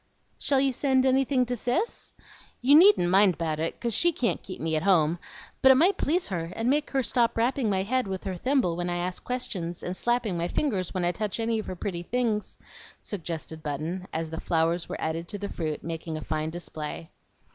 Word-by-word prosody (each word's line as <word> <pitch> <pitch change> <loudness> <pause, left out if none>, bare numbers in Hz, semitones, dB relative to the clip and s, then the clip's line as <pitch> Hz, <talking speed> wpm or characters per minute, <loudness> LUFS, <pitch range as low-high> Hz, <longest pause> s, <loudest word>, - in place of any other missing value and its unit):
"Shall 275 -2 +2
you 270 -1 +2
send 260 0 +2
anything 265 0 +3
to 245 +1 -2
Cis? 245 - -2 0.5
You 260 +4 +4
needn't 315 - +7
mind 195 -1 +5
about 160 -2 -2
it, 165 +1 -2
'cause 235 -2 -1
she 345 +9 +4
can't 250 -7 -1
keep 185 - -8
me 160 0 -1
at 155 - +1
home, 170 -3 +3 0.4
but 265 - +8
it - - +7
might 350 +9 +4
please 340 0 +1
her, 170 -3 -3
and 230 +3 +1
make 295 +1 +1
her 270 -1 0
stop 235 -1 +1
rapping 240 0 +1
my 190 -1 +1
head 255 +3 0
with 190 -1 -4
her 190 -2 -3
thimble 250 -4 +1
when 175 +1 -2
I 175 - -1
ask 180 +1 -3
questions, 185 -9 -3
and 180 - -3
slapping 240 -3 0
my 170 - 0
fingers 195 - -1
when 185 -2 -1
I 175 - +3
touch 210 +4 -3
any 225 0 0
of 215 - -6
her 185 - -4
pretty 175 -1 -4
things," 225 +1 -1 0.4
suggested 160 -5 -6
Button, 155 +6 -4
as 160 0 -3
the 160 - -4
flowers 165 +1 0
were - - -4
added 165 +2 -3
to 205 - -6
the 200 0 -5
fruit, 155 -3 -4
making 165 -1 -4
a - - -6
fine 155 0 -2
display. 160 -1 -6
190 Hz, 215 wpm, -27 LUFS, 165-250 Hz, 0.5 s, but